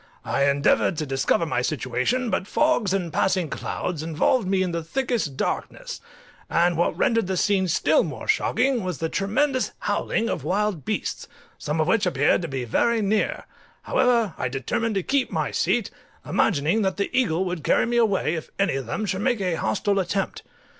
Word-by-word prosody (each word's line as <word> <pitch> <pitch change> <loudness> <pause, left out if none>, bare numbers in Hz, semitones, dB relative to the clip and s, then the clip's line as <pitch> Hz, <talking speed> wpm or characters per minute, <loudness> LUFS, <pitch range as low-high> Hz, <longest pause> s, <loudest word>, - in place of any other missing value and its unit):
I 140 0 +2
endeavoured 140 +3 +2
to 155 - -2
discover 135 +4 +1
my 140 -6 -1
situation, 140 - -1
but 190 - -1
fogs 245 -11 +2
and 180 -5 -1
passing 185 -5 +1
clouds 170 -4 -3
involved 165 - +1
me 190 0 +2
in 180 - -2
the 170 0 -2
thickest 225 - -2
darkness, - - -3 0.5
and 175 +1 +2
what 170 +2 0
rendered 230 -4 +2
the 190 -1 -1
scene 190 0 +2
still 155 -2 +3
more 145 -5 -6
shocking 250 -1 +1
was 180 -4 -3
the 160 - -2
tremendous 255 - 0
howling 230 - 0
of 170 - -3
wild 190 -2 -1
beasts, - - -3 0.3
some 150 +2 -2
of 155 - +3
which 200 +2 +2
appeared 145 -2 +2
to 170 - -3
be 135 -3 -3
very 230 - +1
near: 210 +1 0 0.4
however, 235 -7 +2
I - - 0
determined 215 - -2
to 195 - 0
keep 275 +3 +1
my - - -1
seat, - - 0 0.3
imagining 165 +6 +1
that 190 -2 0
the 200 +5 -2
eagle 190 -8 +2
would 180 -4 -4
carry - - +3
me 240 0 0
away 200 -8 +2
if 160 -2 -5
any 195 0 +1
of 135 -4 -5
them 215 - -2
should 190 0 -2
make 240 0 +1
a 185 -3 0
hostile 195 - 0
attempt. 190 +1 -2
185 Hz, 185 wpm, -24 LUFS, 155-220 Hz, 0.5 s, still